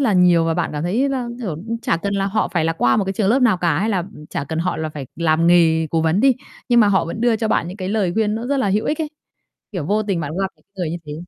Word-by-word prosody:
là 250 -6 +2
nhiều 180 -3 +4
và 165 0 0
bạn 170 0 -1
cảm 150 0 -3
thấy 220 +11 +1
là, 260 -3 -2
kiểu, 235 -5 -4
ừm, 210 +9 -5
chả - - +1
cần 200 +4 -3
là 195 0 0
họ 215 +2 0
phải 165 -3 0
là 165 - +1
qua 125 -7 +2
một 205 - +1
cái 195 - -2
trường 195 0 0
lớp 255 +5 +3
nào 225 -6 +4
cả 170 -4 +1
hay 210 +4 0
là, 205 -4 +1
ừm, 175 -4 -8
chả - - -3
cần 160 +3 -4
họ 175 +1 -1
là 160 0 -3
phải 150 -3 -7
làm 165 0 +2
nghề 165 -2 +4
cố 165 - +1
vấn 160 +4 +2
đi. 270 +2 +5 0.4
Nhưng 240 -1 +5
mà 210 - +5
họ 190 -3 +2
vẫn 170 +6 -5
đưa 235 -1 +3
cho 220 0 -2
bạn 170 - +1
những, 185 - -7
cái, 185 -2 -4
lời 200 -4 0
khuyên 215 -1 +1
nó 230 +2 -4
rất 280 +2 0
là 260 -7 +1
hữu 205 +3 +1
ích 300 - -1
ấy, 310 -2 -2 0.6
kiểu, 180 -7 -3
vô 210 +4 +1
tình 195 -5 -1
bạn 145 -3 -4
gặp 195 - +1
những - - -32
người 175 -4 -2
như 170 - -3
thế. 150 - -6
190 Hz, 325 wpm, -20 LUFS, 165-220 Hz, 0.6 s, đi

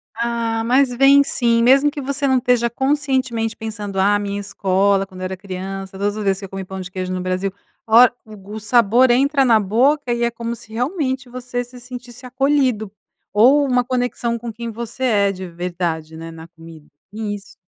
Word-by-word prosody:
Ah, 230 -1 -1
mas 255 +3 +3
vem 275 +3 +6
sim, 235 -4 +1
mesmo 270 +4 +5
que 290 -1 -6
você 280 +1 -1
não 265 -1 +3
esteja 245 -1 +2
conscientemente 260 -3 -1
pensando. 210 -3 -5
"Ah, 200 +2 +4
a - - +1
minha 200 0 -3
escola, 195 0 +1
quando 185 -1 -12
eu - - -3
era 185 0 -4
criança 190 0 -7
todas 205 +2 -1
as 215 - -3
vezes 195 -1 +1
que 195 - -7
eu - - -11
comi 195 0 -6
pão 190 +1 -7
de 180 - -7
queijo 185 -1 -4
no 185 - -3
Brasil 185 +1 -2 0.4
Olha 235 +2 +7
o 215 -1 -12
gos 205 +2 -9
o - - -7
sabor 240 +2 +4
entra 275 +2 +3
na 230 -3 +5
boca 250 +7 +2
e 235 0 -1
é 235 - +2
como 235 0 -5
se 220 - -14
realmente 260 0 -2
você 245 0 -4
se 245 +1 -13
sentisse 245 0 -10
acolhido. 255 -5 0 0.4
Ou 260 +8 +5
uma 250 -2 +2
conexão 245 -2 -1
com 235 0 -6
quem 235 +1 -6
você 235 +3 -6
é 200 -5 +3
de 185 -1 -7
verdade, 170 -2 -4
né, 165 0 -8
na 165 0 -11
comida. 165 -2 -14 0.3
Isso. 205 -2 -6
230 Hz, 205 wpm, -20 LUFS, 195-250 Hz, 0.4 s, Olha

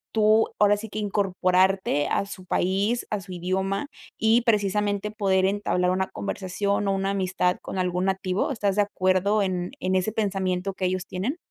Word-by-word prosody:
tú, 215 +1 +4
ahora 205 0 +5
sí 220 +1 -7
que, 215 - -5
incorporarte 190 -5 +1
a 200 - 0
su 185 -2 -9
país, 200 +7 0
a 210 - -1
su 190 -1 -11
idioma, 190 +6 -2 0.3
y 220 +2 +3
precisamente, 205 -2 +1
poder 195 -3 +1
entablar 195 -2 0
una 190 +1 0
conversación 200 +1 -2
o - - +2
una 195 0 -1
amistad 185 -2 0
con 190 - -5
algún 180 0 0
nativo? 190 +3 0
¿Estás 205 -6 0
de 205 - +4
acuerdo 200 +1 +1
en 180 -2 -2
en 185 +1 0
ese 185 +3 +1
pensamiento 195 -3 -1
que 185 - -2
ellos 185 0 -1
tienen? 220 - -3
195 Hz, 170 wpm, -25 LUFS, 185-205 Hz, 0.3 s, ahora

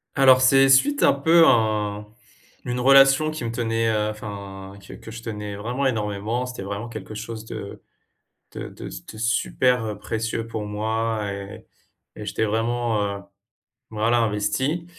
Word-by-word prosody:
Alors, 130 -2 +6
c'est 135 +1 +6
suite 285 - +4
un - - +6
peu 160 +4 +5
à 105 -2 +1 0.6
une 125 0 -2
relation 135 +3 +6
qui 155 -6 -5
me 115 - -2
tenait 115 -1 0 0.2
enfin, 100 -2 -8
que - - -12
que - - -11
je 115 +1 -9
tenais 105 -2 -5
vraiment 120 +7 -3
énormément. 110 +1 -1
C'était 125 -6 -7
vraiment 100 +4 -5
quelque 110 -1 -8
chose 110 +1 -7
de 100 - -8 0.7
de - - -7
de - - -9
de 110 - -10
super, 120 +1 +1
heu, 105 -2 -4
précieux 115 +1 -3
pour 110 -2 -5
moi 110 0 -2
et 100 0 -8 0.5
et 105 - -7
j'étais 105 - -2
vraiment, 115 0 0 0.2
heu, - - -12 0.7
voilà, 115 +2 +1
investi. 115 +10 -1
115 Hz, 150 wpm, -23 LUFS, 105-125 Hz, 0.7 s, Alors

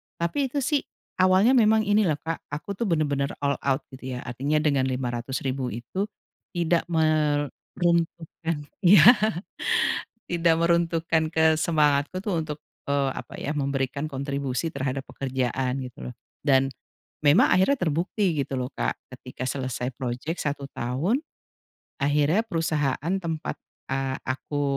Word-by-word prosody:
tapi 220 +12 0
itu 275 +1 -2
sih 295 +1 +2 0.4
awalnya 185 +5 +5
memang 220 -2 +5
ini 210 +1 +4
loh, 155 -5 +1
Kak, 165 +2 -5
aku 150 +7 -5
tuh 215 - -2
bener-bener 145 -4 +1
all 140 0 +2
out 135 +1 +1
gitu 130 -1 -6
ya 125 - -6
artinya 140 +6 -1
dengan 140 -3 +2
Rp.500.000 130 +1 -2
itu 120 - -3 0.5
tidak 170 0 +1
meruntuhkan 160 +1 0 0.2
iya, 180 -4 +7 1.3
tidak 170 -1 +3
meruntuhkan 165 -1 +1
ke 160 -1 +4
semangatku 155 +1 +2
untuk, 155 -5 -2 0.2
eee, 140 -1 +1
apa 125 - -8
ya, 150 +1 -2
memberikan 140 +1 -1
kontribusi 140 +1 -2
terhadap 135 -2 -2
pekerjaan 130 0 -1
gitu 115 - -7
loh, - - -9 0.3
dan 135 -1 +4 0.6
memang 145 +5 +6
akhirnya 190 +10 +4
terbukti 170 +2 0
gitu - - -8
loh, 125 - -2
Kak, - - -1 0.2
ketika 125 0 -7
selesai 130 -2 -2
project 130 +6 -3
1 140 -1 -3
tahun. 140 - 0 0.8
Akhirnya 150 +8 +3
perusahaan 155 -3 0
tempat, 160 -2 -3 0.3
eee, 135 0 -1
aku, 145 +2 -2
150 Hz, 130 wpm, -26 LUFS, 135-170 Hz, 1.3 s, iya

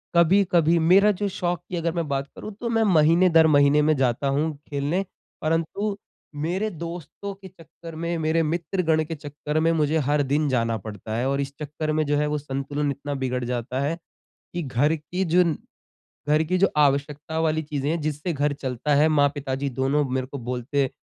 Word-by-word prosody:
कभी-कभी 170 -1 +4
मेरा 200 +2 +6
जो 205 - +1
शौक 175 -1 -1
की 185 - -3
अगर 170 0 0
मैं 170 -3 -2
बात 135 0 -1
करूँ 215 - -7
तो 235 - -2
मैं 225 -1 +2
महीने 165 +4 +5
दर 160 -1 +6
महीने 145 +1 +5
में 155 0 +3
जाता 130 +1 +1
हूँ 150 +3 0 0.2
खेलने, 145 +7 -1 0.4
परंतु 165 +6 -1 0.4
मेरे 180 +8 -1
दोस्तों 170 +3 -7
के 195 0 -13
चक्कर 165 -2 -13
में 170 +1 -2
मेरे 160 +1 +1
मित्रगण 160 0 0
के 165 +1 -5
चक्कर 150 +1 -4
में 165 +1 +3
मुझे 155 -1 +1
हर 145 0 +3
दिन 145 +3 +1
जाना 115 -3 +1
पड़ता 110 +1 -7
है। 125 +3 0
और 140 +1 0
इस 140 0 -5
चक्कर 155 +1 -3
में 155 0 +1
जो 145 0 +1
है 150 0 +1
वो 150 0 -1
संतुलन 140 +1 -2
इतना 140 +1 -5
बिगड़ 125 -1 -1
जाता 125 +1 -3
है 155 +4 -1 0.6
कि 175 -2 -2
घर 145 +4 +1
की 160 +5 -3
जो 180 0 +6 0.9
घर 150 +1 +4
की 185 - +2
जो 195 - +4
आवश्यकता 145 +2 +1
वाली 160 0 +1
चीज़ें 145 -1 -3
हैं 165 0 -1
जिससे 155 +3 -2
घर 145 0 0
चलता 135 +1 -2
है, 150 +3 +5
माँ-पिताजी 140 -2 0
दोनों 145 +3 +2
मेरे 130 0 -1
को 140 +1 -7
बोलते 130 +2 -1
150 Hz, 190 wpm, -24 LUFS, 140-165 Hz, 0.9 s, मेरा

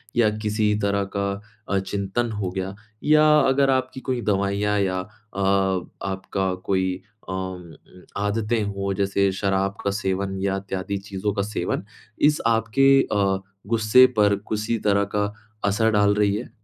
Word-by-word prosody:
या 115 -3 +4
किसी 105 0 +1
तरह 100 0 +1
का 100 0 0 0.4
अ, 100 - +2
चिंतन 100 +4 -2
हो 105 -3 -2
गया 95 +1 -4 0.3
या 155 0 +5
अगर 135 0 +3
आपकी 130 0 0
कोई 125 -2 0
दवाइयाँ 100 0 +1
या 95 -2 0
अ, 90 - -5 0.3
आपका 95 0 -1
कोई 95 -1 +1 0.4
अ, - - -3
म 95 -3 -5 0.4
आदतें 105 +2 0
हों, 100 -1 -2
जैसे 100 0 +1
शराब 95 0 0
का 100 - +1
सेवन 95 -1 -2
या 95 0 0
इत्यादि 95 0 -4
चीज़ों 100 +1 -3
का 100 - -1
सेवन, 100 -3 -2 0.4
इस 150 +1 +4
आपके 115 +4 +3 0.2
अ, 100 -2 +2 0.3
गुस्से 115 +3 +6
पर 105 -1 +4
किसी 110 +2 -1
तरह 100 -1 +2
का 105 0 0 0.3
असर 110 +2 +2
डाल 105 -1 +4
रही 105 -1 +2
हैं? 115 +4 -5
100 Hz, 150 wpm, -23 LUFS, 95-110 Hz, 0.4 s, गुस्से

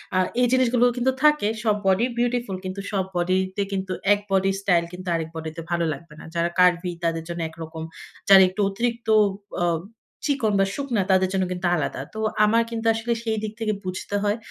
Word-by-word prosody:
আ - - +3 0.2
এই 245 - +4
জিনিসগুলো 250 -1 +3
কিন্তু 250 +2 +2
থাকে। 300 -8 +4 0.2
সব 215 -2 +3
বডি 190 +5 +3
বিউটিফুল 240 -4 0
কিন্তু 185 +1 -4
সব 195 -2 0
বডিতে 185 +2 0
কিন্তু 190 -1 -3 0.2
এক 205 - 0
বডি 195 0 +3
স্টাইল 180 -4 +3
কিন্তু 185 +1 -9
আরেক 160 -1 -3
বডিতে 160 0 -6
ভালো 170 -1 +1
লাগবে 150 +2 -12
না। - - -11
যারা 170 0 +1
কার্ভই 180 0 +3
তাদের 165 -1 0
জন্য 170 0 -4
একরকম। 160 0 -8 0.5
যারা 195 -1 +10
একটু 190 +3 -3
অতিরিক্ত 230 +3 -2 0.6
আ - - +3 0.6
চিকন 260 -8 +1
বা 195 - +4
শুকনা 255 -7 -1
তাদের 190 0 +3
জন্য 190 -1 +1
কিন্তু 180 0 -1
আলাদা। 145 -4 -2
তো 220 - -6 0.3
আমার 230 +2 +3
কিন্তু 230 -1 -5
আসলে 225 +1 -1
সেই 220 -1 -1
দিক 215 -1 -4
থেকে 220 -1 0
বুঝতে 185 +2 -4
হয়, 205 +1 +1
195 Hz, 190 wpm, -24 LUFS, 175-230 Hz, 0.6 s, যারা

